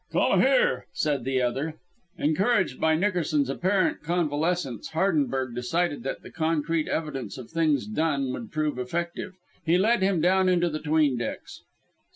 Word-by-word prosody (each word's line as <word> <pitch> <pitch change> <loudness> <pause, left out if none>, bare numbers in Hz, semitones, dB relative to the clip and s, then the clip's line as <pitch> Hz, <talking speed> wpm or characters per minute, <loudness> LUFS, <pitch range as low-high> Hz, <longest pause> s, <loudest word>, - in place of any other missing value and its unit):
"Come - - +3
here," 485 -1 +2
said 145 -6 -1
the 130 -1 +1
other. 135 +6 -2 0.4
Encouraged 185 - +1
by 160 0 +3
Nickerson's 160 -6 +1
apparent 185 +6 +1
convalescence, 160 - -1
Hardenberg 140 -8 0
decided 145 +5 -1
that 135 - -5
the - - -11
concrete 160 0 0
evidence 150 -4 -3
of 130 +1 -10
things 160 -3 +1
done 155 -10 -1
would 115 -4 -7
prove 155 -3 -1
effective. 170 +7 -4 0.3
He 170 +1 +3
led 225 +5 +3
him 190 -2 +2
down 185 +3 +3
into 175 -1 +2
the 155 - -3
'tween 150 -5 +2
decks. - - -6
160 Hz, 150 wpm, -26 LUFS, 140-175 Hz, 0.4 s, Come